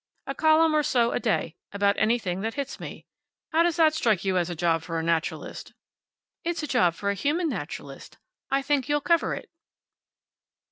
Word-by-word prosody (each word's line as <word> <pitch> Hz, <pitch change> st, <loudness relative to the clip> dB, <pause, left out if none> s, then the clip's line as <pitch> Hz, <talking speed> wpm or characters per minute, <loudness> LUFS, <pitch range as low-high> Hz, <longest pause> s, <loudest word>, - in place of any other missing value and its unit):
A 275 Hz, -, -3 dB
column 315 Hz, +2 st, +4 dB
or 305 Hz, -, +4 dB
so 240 Hz, -5 st, +2 dB
a -, -, 0 dB
day, 200 Hz, -8 st, -1 dB
about 200 Hz, 0 st, +2 dB
anything 215 Hz, -5 st, +1 dB
that 225 Hz, +2 st, -3 dB
hits 280 Hz, -1 st, -4 dB
me. -, -, -8 dB, 0.5 s
How 320 Hz, -, +4 dB
does 340 Hz, -1 st, +2 dB
that 320 Hz, -2 st, +4 dB
strike 220 Hz, -, +1 dB
you 190 Hz, -1 st, +1 dB
as 175 Hz, -1 st, +1 dB
a 175 Hz, -, -4 dB
job 165 Hz, 0 st, +1 dB
for 165 Hz, 0 st, -4 dB
a 160 Hz, -, -1 dB
naturalist?" 165 Hz, -1 st, -2 dB, 0.7 s
"It's 335 Hz, -1 st, -2 dB
a -, -, -2 dB
job 180 Hz, -, +2 dB
for 200 Hz, +2 st, -1 dB
a -, -, 0 dB
human 295 Hz, -, 0 dB
naturalist. -, -, -7 dB, 0.3 s
I 275 Hz, 0 st, +1 dB
think 280 Hz, -1 st, 0 dB
you'll 295 Hz, 0 st, +2 dB
cover 335 Hz, +2 st, +2 dB
it." -, -, -10 dB
240 Hz, 190 wpm, -26 LUFS, 185-305 Hz, 0.7 s, column